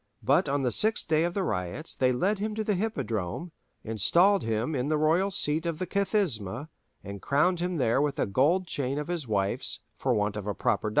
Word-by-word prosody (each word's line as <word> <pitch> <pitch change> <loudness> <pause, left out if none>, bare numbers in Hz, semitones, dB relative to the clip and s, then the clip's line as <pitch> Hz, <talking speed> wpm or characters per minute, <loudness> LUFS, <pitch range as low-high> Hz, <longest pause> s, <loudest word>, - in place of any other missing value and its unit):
But - - +2
on 140 0 0
the 125 - +1
sixth 220 - +2
day 155 0 +2
of 175 - -3
the 200 - 0
riots 90 - -3
they 130 -1 +2
led 190 +11 0
him 215 +1 -3
to 220 - -2
the 210 - 0
Hippodrome, 140 - -3 0.3
installed 170 - +4
him 115 +6 -2
in 130 -1 -1
the 155 0 +1
royal 165 +6 +2
seat 160 -3 +1
of 165 -2 -2
the 185 - -3
Kathisma, 160 - -1 0.3
and 100 0 -8
crowned 165 +6 +1
him 180 0 -2
there 125 -1 +2
with 145 -1 -1
a - - +1
gold 145 - +2
chain 140 -4 -3
of 150 +2 -4
his 170 -7 -3
wife's, 100 -2 0 0.2
for 130 -2 +1
want 105 0 0
of 105 -1 -6
a 105 - -2
proper 105 -1 0
diadem. - - 0
150 Hz, 220 wpm, -27 LUFS, 115-180 Hz, 0.3 s, installed